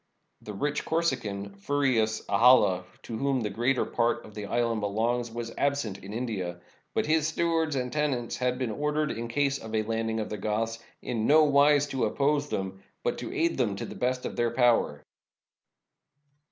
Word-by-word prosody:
The 105 - -8
rich 145 +8 -1
Corsican, 105 -12 -1
Furius 120 -2 +1
Ahalla, 115 -7 +5 0.2
to 115 - -5
whom 135 -2 +1
the 105 -2 -2
greater 125 +6 +1
part 120 0 0
of 110 - -13
the 105 -1 -6
island 115 -1 0
belongs, 115 +4 0
was 115 0 -6
absent 140 -9 0
in 95 +2 -10
India. 105 -7 -3 0.4
But - - +1
his 155 0 +2
stewards 160 -1 0
and 125 -2 -2
tenants 135 -6 -1
had 125 0 0
been 125 -3 -2
ordered, 150 +4 0
in 115 +1 -4
case 140 +3 0
of 110 0 -6
a 110 - +2
landing 115 0 -1
of 110 - -3
the 105 - -4
Goths, 110 +2 -1 0.2
in 115 -3 -1
no 155 +1 +7
wise 145 0 +5
to 130 -4 0
oppose 145 +5 +1
them, 95 0 -4 0.2
but - - -1
to - - -5
aid 165 -3 0
them 110 -6 +1
to - - -5
the - - -8
best 125 0 -1
of - - -4
their 120 0 +1
power. 120 - +2
120 Hz, 180 wpm, -28 LUFS, 110-140 Hz, 0.4 s, no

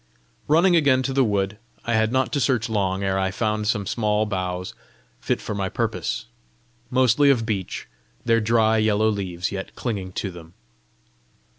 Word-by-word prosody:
Running 175 +4 +4
again 140 -5 +4
to 135 +1 -2
the 135 0 +3
wood, 100 -2 -1 0.3
I 120 - 0
had 110 0 +2
not 130 +3 0
to 145 - +1
search 120 -3 +1
long 100 -3 0
ere 95 0 0
I 95 0 +1
found 105 +1 -1
some 105 -2 0
small 105 0 0
boughs 90 -2 -3 0.5
fit - - -1
for - - -5
my 100 -2 -2
purpose 115 +1 -2 0.6
mostly 130 +2 +4
of 120 -5 +3
beech, 100 -5 -3 0.4
their 115 -1 +3
dry 110 0 +3
yellow 110 0 +2
leaves 95 -3 -3
yet 95 -1 -6
clinging 100 -6 -4
to 100 - -3
them. 85 0 -13
110 Hz, 165 wpm, -23 LUFS, 95-120 Hz, 0.6 s, Running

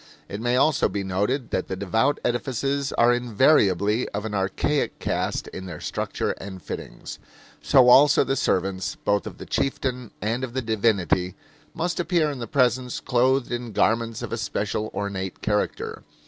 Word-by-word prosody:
It 100 +2 -6
may 120 +1 +1
also 140 +3 +3
be 100 - -3
noted 105 +8 -1
that - - -1
the 95 - -3
devout 110 +9 +1
edifices 135 +3 -1
are 120 +1 +4
invariably 115 - +2
of 105 +1 -4
an 110 - -4
archaic 100 +9 0
cast - - -2
in 95 0 -8
their 85 -4 -7
structure - - -2
and 95 -1 -8
fittings. - - -8 0.4
So 130 -2 +5
also 140 +3 +7
the 135 - -1
servants, 95 -6 -1
both 100 0 0
of - - -8
the - - -9
chieftain 125 -3 -2
and 115 +4 -2
of 125 -2 -4
the 130 - 0
divinity, 100 -5 +1 0.4
must 175 +1 -2
appear 170 -4 +1
in 140 - -7
the 115 - -5
presence 125 -3 +1
clothed 130 +1 +1
in 120 -2 -4
garments 115 +2 +1
of - - -5
a - - -1
special, 105 -1 -2
ornate 95 -2 -4
character. 105 -1 -1
115 Hz, 165 wpm, -24 LUFS, 100-130 Hz, 0.4 s, also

